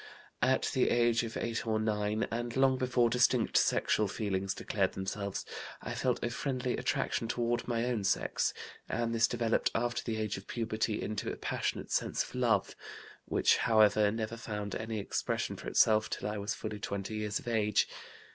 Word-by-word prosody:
"At - - +2
the - - +3
age 120 -1 +3
of 115 -1 -4
8 115 0 -2
or 110 -1 +1
9, 105 0 0
and 120 +1 -3
long 135 0 +5
before 125 -2 +2
distinct 125 +1 +2
sexual 105 - +3
feelings 95 -1 -2
declared 95 -3 0
themselves, 100 +1 -3 0.3
I - - -5
felt - - 0
a 120 - -1
friendly 130 0 -1
attraction 115 - -1
toward 120 0 -1
my 115 -1 0
own 120 -4 -1
sex, 95 - +1 0.4
and 115 0 -1
this 115 0 +4
developed 115 -1 +1
after 120 +1 0
the 115 -2 -2
age 110 -2 -2
of 95 - -10
puberty 110 -2 -1
into 105 -1 -3
a - - -4
passionate - - -3
sense - - +1
of - - -11
love, 115 -6 +1 0.5
which, - - +3
however, 110 -2 +4
never 110 +1 -3
found 105 -3 -4
any 110 0 -3
expression 100 - -2
for - - -9
itself 110 -1 +4
till - - -3
I 105 0 -3
was 100 +2 -2
fully 105 -1 -5
20 100 +1 -4
years 105 -1 -1
of - - -9
age. 105 -3 +2
110 Hz, 175 wpm, -32 LUFS, 105-120 Hz, 0.5 s, long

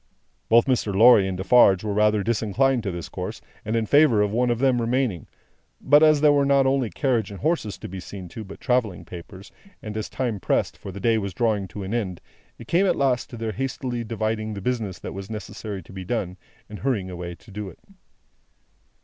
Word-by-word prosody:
Both 115 +1 +6
Mr. 120 -7 0
Lorry 110 -2 +7
and 95 -1 -3
Defarge 95 0 +5
were 105 -1 -2
rather 105 0 +2
disinclined 115 +4 +1
to 100 -3 -3
this 85 -1 -6
course, - - -6 0.2
and 110 - -2
in 115 -1 +1
favour 135 -5 +5
of 105 - -1
one 120 +3 +1
of 120 - +1
them 130 -1 +2
remaining. 115 - -1 0.5
But, 145 +2 +5
as 155 -2 +5
there 150 -1 +6
were 140 -1 +3
not 140 -1 +3
only 135 -3 +1
carriage 120 -6 0
and 100 -2 -9
horses 155 - -1
to - - -8
be 95 +1 -7
seen 95 0 -8
to, 110 - -8
but 100 -1 -11
travelling 125 -8 0
papers; 95 +2 -11 0.3
and 110 -5 -7
as 110 -1 -4
time 120 -6 -2
pressed, - - 0
for 100 - -9
the 100 - -8
day 110 +2 +2
was 100 -2 -5
drawing 110 -5 0
to 100 +3 -7
an 95 +3 -5
end, 95 -7 -2 0.4
it - - -12
came 190 +4 +3
at - - +2
last 130 -3 0
to 120 - -9
their 115 -1 -3
hastily 125 -1 -3
dividing 110 -1 -3
the - - -5
business 110 -4 -2
that - - -7
was 100 +1 -7
necessary 105 -2 -6
to 95 - -15
be 95 -1 -6
done, 90 -3 -3 0.3
and 105 - -9
hurrying 105 -9 -1
away 85 -1 -6
to 105 - -18
do 105 0 -5
it. - - -15
110 Hz, 220 wpm, -24 LUFS, 100-125 Hz, 0.5 s, Lorry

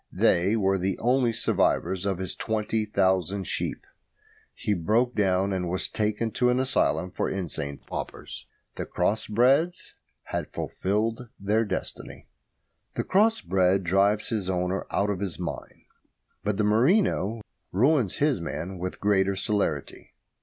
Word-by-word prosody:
They 95 +5 +3
were 95 -3 +2
the 95 +1 -1
only 125 0 +2
survivors 95 -3 +1
of 95 -2 0
his 95 0 -3
twenty 110 0 -1
thousand 95 -1 +1
sheep. - - -2 0.7
He 105 - -1
broke 110 +8 +1
down, 95 -1 +1
and 90 -2 -2
was 95 +1 -1
taken 110 +1 -1
to 125 +3 +2
an 125 +1 +2
asylum 125 -8 +1
for - - -1
insane 80 -6 -3
paupers. - - -7 0.3
The - - -4
cross 110 +2 0
breds 135 +11 +2 0.3
had - - -4
fulfilled 110 +5 -2
their 105 +3 +1
destiny. - - -5 0.7
The - - -1
cross 220 +4 +3
bred 95 0 +2
drives 100 +4 +2
his 105 -5 -2
owner 90 +1 -1
out 100 +1 +1
of 95 - -3
his 95 -4 -4
mind, 90 -2 -6 0.6
but 105 -1 -1
the 105 - +1
merino 115 - +2 0.3
ruins 125 - +2
his 145 - +1
man 85 +3 -5
with 90 +1 -4
greater 100 -1 +2
celerity. 95 -7 -2
100 Hz, 140 wpm, -26 LUFS, 95-115 Hz, 0.7 s, They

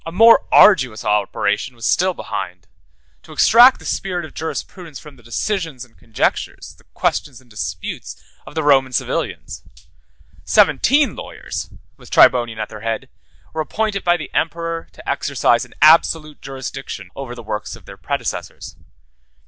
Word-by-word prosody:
A 165 - -7
more 225 +6 +6
arduous 130 - +5
operation 105 +3 0
was 115 -1 -7
still 185 0 +2
behind—to 85 -7 -9
extract 245 +3 +6
the - - -15
spirit 180 -4 -3
of 155 - -13
jurisprudence 160 0 -6
from 150 0 -13
the 125 - -19
decisions 130 - -3
and 115 -2 -28
conjectures, 115 - -3
the - - -25
questions 140 -4 -1
and 130 - -23
disputes, 105 - -6 0.3
of - - -11
the 160 - -1
Roman 135 -3 +3
civilians. - - -3 0.8
Seventeen 290 +2 +3
lawyers, - - -7 0.3
with - - -16
Tribonian 120 -3 +4
at 110 -1 -4
their 105 - -10
head, 115 0 -3 0.4
were 160 - -2
appointed 210 +4 -2
by 175 0 +3
the 155 - -9
emperor 165 +1 -2
to - - -15
exercise - - +1
an - - -20
absolute 155 -1 +4
jurisdiction 135 -7 -7
over 130 -3 -7
the 120 - -10
works 105 -1 -5
of - - -17
their - - -11
predecessors. - - -5
135 Hz, 150 wpm, -19 LUFS, 115-170 Hz, 0.8 s, more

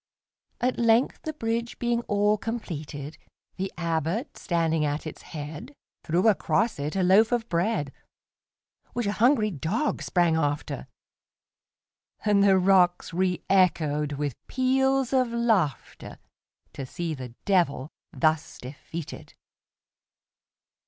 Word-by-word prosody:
At 250 +1 0
length, 230 +2 +3
the 310 - -3
bridge 230 -3 -3
being 240 0 0
all 205 +1 +3
completed, 155 -10 -6 0.4
The 190 +1 -3
Abbot, 170 - -2
standing 165 -3 0
at 145 +1 -2
its 155 - -7
head, 155 - -8 0.3
Threw 175 +6 +1
across 220 -1 +2
it 145 +4 -3
a 190 - +1
loaf 200 +6 +5
of 235 -2 0
bread, 170 -5 0 1.0
Which 240 -2 -2
a 200 - +1
hungry 220 -1 +3
dog 185 - -1
sprang 175 -3 +2
after, 145 -2 -2 1.4
And 205 -1 +4
the 195 -1 +5
rocks 185 -2 +3
reëchoed 170 -4 +1
with 145 -1 -2
peals 265 0 +1
of 255 -1 +3
laughterTo 225 - -1 0.7
see 170 +3 -4
the 125 -4 -8
Devil 165 -7 +1 0.2
thus 155 -1 0
defeated! 145 +5 -8
185 Hz, 110 wpm, -26 LUFS, 155-230 Hz, 1.4 s, loaf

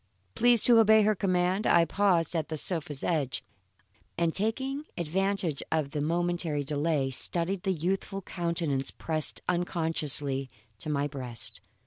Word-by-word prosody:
Pleased 240 -2 +4
to 235 -2 +7
obey 220 -1 +6
her 215 +1 +3
command, 185 0 0
I 170 -1 +5
paused 180 -2 +1
at 160 -2 -1
the 160 - -3
sofa's 150 -4 0
edge, 150 -7 -1 0.7
and 165 -1 +1
taking 265 +8 -1
advantage 180 -1 0
of 155 -3 0
the 150 -1 -2
momentary 170 -1 0
delay, 145 -1 0
studied 175 +8 -1
the 190 - 0
youthful 190 +3 -2
countenance 170 -7 -1
pressed 155 -2 -2
unconsciously 160 -6 0 0.3
to - - -5
my 145 -1 0
breast. 130 -5 -7
170 Hz, 135 wpm, -28 LUFS, 150-190 Hz, 0.7 s, to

